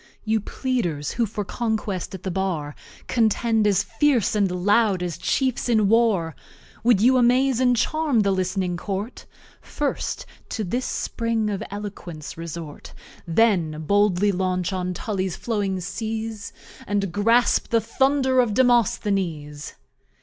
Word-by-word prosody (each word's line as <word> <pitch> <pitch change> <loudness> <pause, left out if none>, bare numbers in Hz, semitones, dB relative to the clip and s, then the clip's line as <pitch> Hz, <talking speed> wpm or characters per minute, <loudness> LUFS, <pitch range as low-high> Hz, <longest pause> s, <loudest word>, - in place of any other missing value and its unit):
You 220 0 +1
Pleaders, 190 - -2
who 235 -2 0
for 205 0 -4
Conquest 215 -5 -3
at 185 - -10
the 190 - -2
Bar 170 -6 -2 0.3
Contend 225 -1 +2
as 195 -1 +3
Fierce 245 -2 +1
and 205 -3 +2
Loud 195 +1 +2
as 175 -2 -3
Chiefs 260 -2 -1
in 215 -3 +3
War; 205 -8 +2 0.5
Would 230 -4 +4
you 255 +3 +5
Amaze 250 +1 +3
and 250 -1 +3
Charm 300 -2 +1
the 200 -1 +2
list'ning 185 -1 -1
Court? 200 +6 -5 0.3
First 290 -1 -3 0.2
to 220 - -3
this 245 +7 -2
Spring 230 -2 -1
of 200 - -3
Eloquence 195 -6 -7
resort: 165 -2 -8 0.3
Then 165 -5 +2
boldly 205 +1 +3
launch 185 0 -1
on 180 -1 -2
Tully's 190 -3 -2
flowing 205 -5 -2
Seas, 220 +2 -4 0.4
And 200 -2 -1
grasp 230 +5 +3
the 230 - +2
Thunder 265 +3 +1
of 230 -5 +2
Demosthenes. 190 - 0
205 Hz, 135 wpm, -23 LUFS, 185-235 Hz, 0.5 s, you